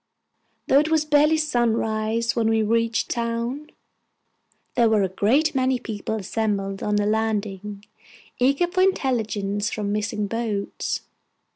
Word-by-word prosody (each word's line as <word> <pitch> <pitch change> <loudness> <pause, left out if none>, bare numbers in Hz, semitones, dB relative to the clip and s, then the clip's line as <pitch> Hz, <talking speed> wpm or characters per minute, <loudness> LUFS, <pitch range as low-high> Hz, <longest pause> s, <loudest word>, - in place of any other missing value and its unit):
Though 275 - +5
it 305 +2 +1
was 315 -1 +2
barely 300 +1 +4
sunrise 230 -5 0
when 225 -1 +2
we 225 -1 +2
reached 230 +1 +1
town, 235 +5 -3 1.0
there 235 -2 +3
were 215 -2 +3
a - - +2
great 235 - +2
many 260 -1 +1
people 220 -2 -4
assembled 200 -1 -2
at 210 0 0
the 205 - +1
landing 210 -2 -2 0.5
eager 275 +7 +3
for 365 +2 -1
intelligence 220 - 0
from 205 -2 -3
missing 210 0 -1
boats. 215 -2 -3
225 Hz, 130 wpm, -23 LUFS, 210-260 Hz, 1.0 s, Though